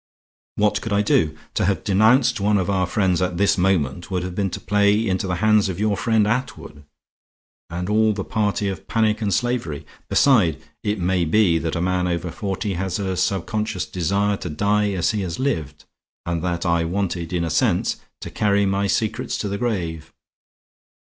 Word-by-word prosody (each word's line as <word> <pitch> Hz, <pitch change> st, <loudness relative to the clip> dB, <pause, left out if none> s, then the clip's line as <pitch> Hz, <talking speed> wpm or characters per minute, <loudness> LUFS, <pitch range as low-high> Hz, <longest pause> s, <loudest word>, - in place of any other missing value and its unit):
What 105 Hz, 0 st, +1 dB
could 115 Hz, -, -5 dB
I 100 Hz, +1 st, +3 dB
do? 80 Hz, -6 st, +1 dB, 0.2 s
To -, -, 0 dB
have 100 Hz, +1 st, 0 dB
denounced 110 Hz, +5 st, +3 dB
one 105 Hz, +1 st, +2 dB
of 95 Hz, 0 st, 0 dB
our 95 Hz, -2 st, +1 dB
friends 95 Hz, -2 st, +1 dB
at 90 Hz, -1 st, -1 dB
this 100 Hz, +2 st, +3 dB
moment 90 Hz, -4 st, 0 dB
would 90 Hz, -2 st, -2 dB
have 90 Hz, 0 st, -5 dB
been 95 Hz, +1 st, -1 dB
to 85 Hz, -, -6 dB
play 105 Hz, +2 st, +2 dB
into 95 Hz, 0 st, -1 dB
the 90 Hz, -, -1 dB
hands 105 Hz, +1 st, +3 dB
of 95 Hz, 0 st, -4 dB
your 105 Hz, -1 st, +1 dB
friend 110 Hz, +2 st, +2 dB
Attwood, 105 Hz, -, -3 dB, 0.8 s
and 90 Hz, +1 st, -4 dB
all 110 Hz, +1 st, +3 dB
the 100 Hz, -2 st, -3 dB
party 105 Hz, 0 st, -1 dB
of 95 Hz, -, -5 dB
panic 110 Hz, -1 st, +1 dB
and 105 Hz, -2 st, 0 dB
slavery. 105 Hz, -, -1 dB, 0.2 s
Besides, 105 Hz, -, +4 dB, 0.2 s
it 105 Hz, +1 st, -1 dB
may 90 Hz, -1 st, +1 dB
be 85 Hz, 0 st, +3 dB
that 80 Hz, +1 st, -3 dB
a 85 Hz, -, -1 dB
man 90 Hz, 0 st, 0 dB
over 85 Hz, 0 st, -2 dB
forty 100 Hz, -1 st, -3 dB
has 95 Hz, 0 st, -2 dB
a 95 Hz, -2 st, -2 dB
subconscious 100 Hz, +2 st, -1 dB
desire 100 Hz, +4 st, 0 dB
to 85 Hz, -, -6 dB
die 105 Hz, +6 st, +1 dB
as 90 Hz, -3 st, +1 dB
he 105 Hz, -2 st, -2 dB
has 85 Hz, -3 st, -4 dB
lived, 80 Hz, -, -3 dB, 0.4 s
and 85 Hz, -1 st, -2 dB
that 85 Hz, -1 st, -2 dB
I 85 Hz, -1 st, +2 dB
wanted, 90 Hz, -1 st, -2 dB
in 90 Hz, -2 st, -1 dB
a 85 Hz, -, -2 dB
sense, -, -, +1 dB, 0.2 s
to -, -, -7 dB
carry 100 Hz, -1 st, +2 dB
my 100 Hz, +1 st, 0 dB
secrets 110 Hz, +4 st, -1 dB
to 105 Hz, -, -3 dB
the 100 Hz, 0 st, -3 dB
grave. 85 Hz, -9 st, -3 dB
95 Hz, 190 wpm, -22 LUFS, 90-105 Hz, 0.8 s, Besides